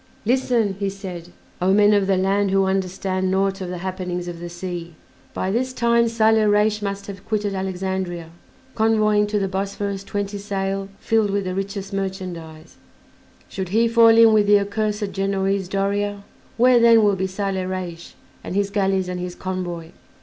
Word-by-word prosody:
"Listen," 240 -3 +1
he 200 -1 0
said, 185 -3 -8 0.3
"O 185 +1 +3
men 210 +1 +5
of 200 -2 +2
the 195 -1 +2
land 195 +2 +1
who 195 0 +3
understand 190 0 -1
naught 195 +1 0
of 185 - -4
the 180 - -4
happenings 180 -1 -4
of 175 -1 -6
the 175 0 -6
sea. 175 -1 -6 0.4
By 190 - -1
this 255 +4 -1
time 235 -1 +3
Saleh 220 -1 +3
Reis 210 +1 +2
must 200 -1 -4
have 195 -1 -9
quitted 210 -2 -1
Alexandria 190 -3 -3 0.4
convoying 215 -2 +2
to 210 0 -1
the 195 -1 0
Bosphorus 195 +1 -3
twenty 205 0 -4
sail 195 -1 -3
filled 220 -2 +1
with 200 0 0
the 185 -1 -3
richest 195 +1 -4
merchandise; 180 -5 -6 0.7
should 190 -2 -5
he 225 +4 +3
fall 230 -1 +6
in 225 -1 +7
with 210 -1 +4
the 205 0 +6
accursed 210 0 -2
Genoese, 195 -1 -1
Doria, 200 +1 -1 0.3
where 245 +1 +5
then 230 -1 +6
will 205 -1 +3
be 190 0 -1
Saleh 190 -1 -3
Reis 175 -2 -6 0.3
and - - -5
his 200 0 0
galleys 195 -2 +1
and 180 0 -4
his 180 0 -5
convoy? 175 -3 -5
195 Hz, 170 wpm, -22 LUFS, 185-210 Hz, 0.7 s, in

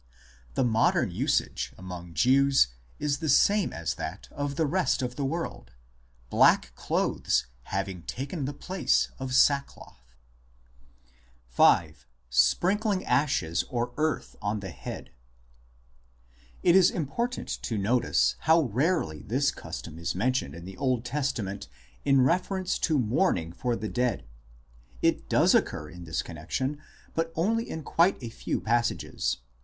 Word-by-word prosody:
The - - +2
modern 115 -2 +2
usage - - -1
among 90 -2 -8
Jews 135 - +4 0.3
is 145 -2 -1
the 160 - -2
same 200 +8 +4
as 80 0 -3
that - - -6
of 145 -1 -3
the 160 - +1
rest 170 -4 +1
of 125 0 -3
the 140 - -3
world, 135 - -4 0.6
black - - +4
clothes - - 0 0.2
having 95 -2 -3
taken 135 - -4
the 140 - -2
place 185 +6 0
of 130 -1 -3
sackcloth, 130 - 0 1.4
i 80 - +6
V. 75 - -22 0.3
SPRINKLING 185 - +2
ASHES 85 - +1
OR 120 0 -2
EARTH 155 0 -1
ON 105 0 -2
THE 95 -3 -6
HEAD - - -8 1.5
It 175 - +5
is 190 -2 +7
important 235 - -3
to 115 - -3
notice 115 +5 +2
how 160 +1 +4
rarely 125 - 0
this 135 - +1
custom 80 -1 -8
is 85 - -2
men 115 +8 +2
tioned 75 - -2
in 85 +1 -9
the 95 0 -9
Old 125 -3 0
Testament 120 -7 -2 0.4
in 135 -1 +4
reference 185 +6 +1
to 155 -3 +2
mourning 115 - +1
for 120 +5 -1
the 110 - -4
dead. 125 +2 -1 0.8
It - - +1
does - - +4
occur 75 0 0
in 90 -1 -10
this 80 -1 -2
connexion, 130 - -4 0.3
but 165 0 -1
only 225 +8 0
in 160 - -5
quite 170 +6 +3
a 115 - -4
few - - -3
passages. 115 - 0
130 Hz, 140 wpm, -28 LUFS, 95-155 Hz, 1.5 s, is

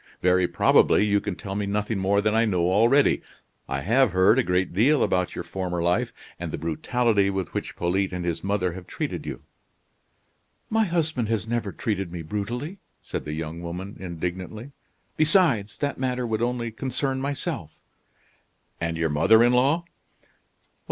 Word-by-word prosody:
Very 90 0 +4
probably 105 - +4
you 100 -1 +2
can 100 - -3
tell 95 +2 -6
me 100 0 -2
nothing 105 +1 -1
more 100 +2 +2
than 105 +1 +1
I 115 +1 +4
know 90 -5 +1
already. 115 +8 +4 0.5
I - - -2
have 115 +1 +3
heard 95 +7 +5
a - - +3
great 90 -1 0
deal 130 - +4
about 90 -1 0
your - - -4
former 90 -2 -3
life, 85 +1 +1 0.3
and - - -4
the - - -3
brutality 100 +6 +1
with 95 -3 -3
which - - -4
Polyte 95 +3 0
and 90 -1 -4
his 85 -2 -2
mother 95 -3 0
have 90 0 -9
treated - - -4
you." - - -6 1.3
"My 220 0 +3
husband 160 - 0
has 110 -2 -1
never 115 -3 -1
treated 100 -5 -3
me 85 -2 -6
brutally," 120 - -4 0.2
said - - -5
the 75 - -4
young 80 +1 -5
woman, 90 +4 -6
indignantly; 90 - -5 0.5
"besides, 155 - +3
that 145 -2 -2
matter 125 -1 -1
would 110 -1 -1
only 120 -1 -1
concern 130 +3 -2
myself." 135 - -3 1.1
"And 85 0 -2
your 80 -1 +1
mother 110 +10 +5
in 120 +1 +4
law?" 140 +7 +3
100 Hz, 165 wpm, -25 LUFS, 90-125 Hz, 1.3 s, heard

